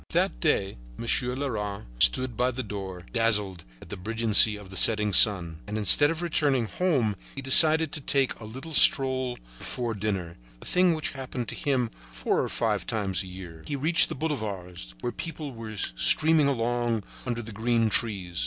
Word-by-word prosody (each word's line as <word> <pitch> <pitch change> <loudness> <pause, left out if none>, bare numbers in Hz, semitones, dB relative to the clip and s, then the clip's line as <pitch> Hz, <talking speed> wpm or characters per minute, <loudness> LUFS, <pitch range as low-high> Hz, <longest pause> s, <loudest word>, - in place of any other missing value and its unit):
That - - 0
day 95 +1 0 0.2
Monsieur 125 +1 -1
Leras 105 -8 -4 0.2
stood 125 - +4
by 125 +3 +1
the 130 +1 -5
door, 95 -4 -7
dazzled 105 -7 0 0.2
at - - -16
the 105 - -6
brilliancy 110 +2 +2
of 100 -2 -12
the - - -9
setting 105 0 +2
sun; 85 -5 +3
and 105 +1 -4
instead 125 +8 +5
of 165 +2 -4
returning 145 -7 0
home 130 - -1 0.2
he 135 - -6
decided 155 +3 +7
to 150 - -6
take 135 -1 -1
a 110 - -10
little 130 +9 -9
stroll 130 -3 +4 0.2
before 120 -2 -4
dinner, 95 -5 -4 0.2
a - - -14
thing 180 -2 +2
which 155 - -4
happened 130 -3 -6
to - - -7
him 130 -7 -1 0.2
four - - -1
or - - -3
five 105 -5 -2
times 100 -5 -1
a 95 - -8
year. 90 -3 -11
He 145 - -3
reached 160 +5 +3
the - - -5
boulevards, 100 - -5
where 120 - -3
people 155 -2 -7
were 115 -3 -9
streaming 140 - +3
along 120 -3 -1 0.2
under 120 -1 -3
the 110 - -10
green 115 +1 0
trees. 95 - -2
115 Hz, 180 wpm, -26 LUFS, 100-135 Hz, 0.2 s, decided